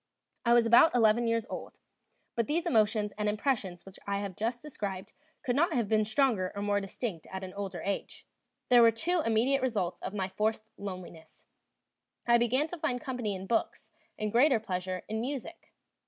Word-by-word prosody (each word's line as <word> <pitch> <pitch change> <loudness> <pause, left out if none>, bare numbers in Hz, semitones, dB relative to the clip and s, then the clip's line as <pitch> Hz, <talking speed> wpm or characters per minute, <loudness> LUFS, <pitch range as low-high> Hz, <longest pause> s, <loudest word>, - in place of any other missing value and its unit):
I 235 - +5
was 240 -1 +6
now - - 0
about 245 +5 +7
eleven 230 0 +4
years 230 -1 +1
old, - - -8 0.6
but 230 -2 0
these 335 +3 0
emotions 215 -7 +2
and 210 0 +1
impressions 210 -5 -2
which 195 -1 -13
I 200 0 0
have 200 -2 -4
just 230 +4 -2
described 200 -8 -6 0.3
could 245 - 0
not 335 +4 +2
have 235 -7 +1
been 215 0 +2
stronger 215 -5 +1
or 200 - -3
more 205 0 +1
distinct 195 -3 -5
at 190 0 -5
an 185 -1 -7
older 195 -3 -5
age. 200 0 -4 0.4
There 245 -1 +7
were 230 - +8
two 330 +10 0
immediate 235 +5 +2
results 210 -9 -1
of 210 - -6
my 190 -2 -1
forced 215 +3 -1
loneliness: 180 -5 -9 0.8
I 235 0 +5
began 255 +6 +2
to 355 - -7
find 250 -4 -1
company 245 -8 -3
in 190 0 -7
books, 225 +3 -2 0.3
and 215 -1 -2
greater 250 +1 +4
pleasure 185 -3 -4
in 220 +1 -2
music. 275 +6 -6
220 Hz, 185 wpm, -30 LUFS, 200-245 Hz, 0.8 s, were